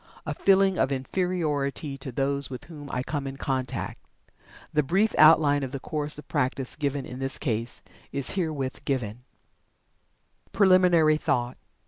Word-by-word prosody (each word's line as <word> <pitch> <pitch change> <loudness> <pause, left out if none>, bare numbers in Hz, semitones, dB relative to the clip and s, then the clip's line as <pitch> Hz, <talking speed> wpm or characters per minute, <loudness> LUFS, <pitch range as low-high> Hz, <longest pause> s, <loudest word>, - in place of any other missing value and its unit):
a - - -2
feeling 195 -1 +3
of 135 - +2
Inferiority 145 -1 -1
to 135 -1 -7
those 140 +2 -1
with 130 -2 -7
whom 150 -4 -10
I 125 - -2
come 140 -1 -3
in 135 0 -6
contact." 130 -2 -3 0.7
The 150 - +4
brief 190 +9 +1
outline 155 -2 +6
of 135 -2 -4
the 135 - -4
course 150 +2 -3
of 150 - -11
practice 130 0 -1
given 140 -2 -2
in 125 - -8
this 135 0 0
case 115 -4 -1 0.3
is 140 -1 +2
herewith 155 -8 -3
given: 125 -3 -3 1.3
PRELIMINARY 180 -5 +5
THOUGHT. 120 -4 -1
140 Hz, 145 wpm, -26 LUFS, 130-160 Hz, 1.3 s, outline